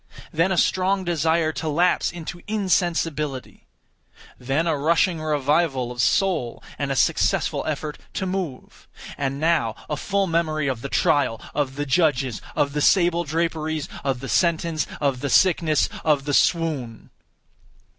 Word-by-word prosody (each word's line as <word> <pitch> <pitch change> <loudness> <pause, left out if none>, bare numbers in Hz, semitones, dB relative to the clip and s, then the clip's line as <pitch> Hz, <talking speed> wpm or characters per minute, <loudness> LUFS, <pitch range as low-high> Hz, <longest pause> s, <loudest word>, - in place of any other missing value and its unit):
Then 165 +4 +2
a 190 - 0
strong 185 +3 +2
desire 165 -1 +1
to 160 - -3
lapse 175 +5 +2
into 175 0 -8
insensibility. 165 -9 -1 0.7
Then 135 +6 0
a 165 -2 +1
rushing 165 +3 +1
revival 145 -3 0
of 120 -1 -2
soul 160 - +1 0.2
and 140 -1 -1
a - - 0
successful - - +1
effort 150 -1 -4 0.2
to 190 - -1
move. 180 -8 -5 0.3
And 140 0 -3
now 155 -8 +1
a 150 - -2
full 200 +6 0
memory 160 -4 0
of 130 -4 -2
the 140 - -5
trial, 135 -7 +1
of 140 -2 -1
the 145 +1 -2
judges, 135 - +1
of 140 -1 +1
the 150 - -1
sable 175 0 +3
draperies, 160 -1 -2 0.2
of 135 -3 -1
the 135 - -6
sentence, 165 -2 +1
of 140 -3 0
the 140 - -3
sickness, 165 -4 +3 0.2
of 145 -3 +2
the 145 - -2
swoon. 145 - 0
155 Hz, 145 wpm, -23 LUFS, 140-170 Hz, 0.7 s, sable